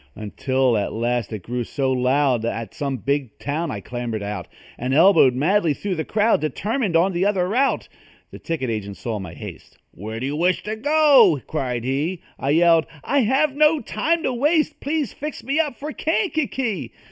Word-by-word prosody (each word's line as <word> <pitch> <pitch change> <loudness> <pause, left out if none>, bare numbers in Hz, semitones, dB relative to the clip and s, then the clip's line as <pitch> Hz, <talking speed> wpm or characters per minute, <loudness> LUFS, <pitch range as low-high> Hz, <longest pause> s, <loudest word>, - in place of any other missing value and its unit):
Until 130 +3 0
at 100 - -2
last 120 0 -1
it 105 -5 -6
grew 120 +3 -3
so 135 +2 -1
loud, 130 -1 +2
At 115 0 -4
some 140 -2 -3
big 135 0 -2
town 155 +3 -3
I 100 - -5
clambered 120 -1 -4
out 105 +1 -5 0.3
And 130 +2 -1
elbowed 160 -6 +6
madly 165 +2 +2
through 200 +5 -3
the 160 -3 -2
crowd, 215 -2 +2
Determined 200 - -1
on 180 +4 +3
the 175 +2 0
other 195 -3 +1
route. 260 +6 +1 0.4
The - - -10
ticket 150 -8 -3
agent 100 -3 -5
saw 110 -3 -4
my 90 -4 -8
haste; - - -10
"Where 110 +4 -7
do 130 - -3
you 140 +2 -2
wish 175 +3 +1
to 215 +1 -3
go?" 270 - +5
cried 125 -6 -3
he. 145 +8 -2 0.2
I 135 - -2
yelled: 165 +1 +4 0.2
"I 285 - +1
have 270 +4 +2
no 305 +1 +4
time 320 +9 -1
to 260 - 0
waste 305 +4 +1
Please 290 -3 -2
fix 300 +1 -6
me 275 +5 0
up 295 -5 0
for 300 +2 -5
Kankakee!" 295 - -1
160 Hz, 185 wpm, -22 LUFS, -, 0.4 s, elbowed